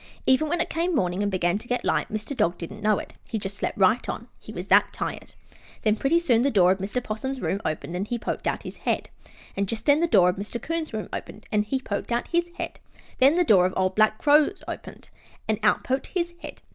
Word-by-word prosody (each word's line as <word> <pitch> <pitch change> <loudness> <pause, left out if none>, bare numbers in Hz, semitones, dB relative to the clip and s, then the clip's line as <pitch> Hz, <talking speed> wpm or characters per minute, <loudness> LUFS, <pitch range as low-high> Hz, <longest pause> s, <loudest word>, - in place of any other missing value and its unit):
Even 260 +4 +3
when 345 - 0
it - - 0
came 335 +2 0
morning 180 -6 0
and 205 0 0
began 180 +1 +1
to 240 - -12
get 245 0 -1
light - - 0
Mr. 215 +6 -3
Dog 195 -7 +1
didn't 205 +5 -8
know 210 -1 +3
it; - - -7 0.2
he 225 - -1
just 200 -1 -5
slept - - -3
right 215 +5 +3
on, - - -5
he - - -11
was - - -6
that - - +5
tired. - - -5 0.5
Then 215 -1 +3
pretty 275 +9 +2
soon 255 -9 +3
the 275 - +3
door 185 -7 +5
of 190 - 0
Mr. 210 +6 -2
'Possum's 260 +5 -4
room 200 -4 -1
opened 155 +2 -3
and 190 +3 -2
he 240 - -2
poked 230 - -3
out - - -1
his - - -8
head. - - -1 0.5
And 200 0 0
just 220 +2 -4
then 290 0 +5
the 340 - +2
door 180 - +5
of 180 - -2
Mr. 205 +4 -4
'Coon's 330 +2 -3
room 215 -2 -4
opened 215 - -7
and 210 0 +2
he 265 +5 -1
poked 205 -2 -4
out 235 +1 -1
his 345 0 +1
head. - - -5 0.4
Then 275 +4 +6
the 355 - +4
door 190 - +5
of 185 - -5
the - - -6
old 185 0 +1
black 215 +1 +3
Crow 295 +2 +5 0.2
opened - - -8 0.4
and 215 -1 0
out 210 0 +3
poked 260 +1 -1
his 345 -2 -2
head. - - -10
220 Hz, 250 wpm, -25 LUFS, 200-275 Hz, 0.5 s, Then